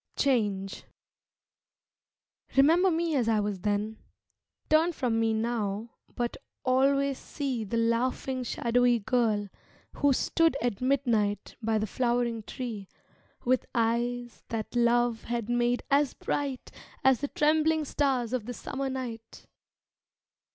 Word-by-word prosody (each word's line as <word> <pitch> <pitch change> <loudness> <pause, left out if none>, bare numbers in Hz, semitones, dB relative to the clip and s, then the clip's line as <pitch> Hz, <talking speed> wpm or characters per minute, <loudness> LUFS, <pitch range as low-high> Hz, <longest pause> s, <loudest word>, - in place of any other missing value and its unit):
Change 205 -7 0 1.7
Remember 330 +7 +6
me 330 -2 0
as 240 -4 +2
I 220 -1 +3
was 205 -2 -2
then; 210 +3 -1 0.7
Turn 320 +3 +3
from 240 -6 0
me 225 0 +2
now, 220 -1 -2 0.2
but 240 -1 -2 0.3
always 275 +1 +2
see 265 -6 -3
The 215 +3 -3
laughing 250 +3 0
shadowy 245 0 +2
girl 220 -2 +1 0.5
who 285 -1 +3
stood 325 +3 +2
At 240 -4 -2
midnight 235 -7 +1
by 220 0 +1
the 215 - 0
flowering 235 0 0
tree, 215 -3 -6 0.6
With 255 +1 +2
eyes 240 +1 -1
that 225 +1 -4
love 240 -1 +2
had 235 -1 -3
made 240 0 +1
as 280 -1 +3
bright 275 -3 -3 0.3
As 265 -1 +4
the 285 - -1
trembling 310 +1 +2
stars 260 -5 0
of 240 -3 -2
the 245 - -4
summer 270 +4 -4
night. 240 -4 -6
240 Hz, 125 wpm, -28 LUFS, 225-270 Hz, 1.7 s, Remember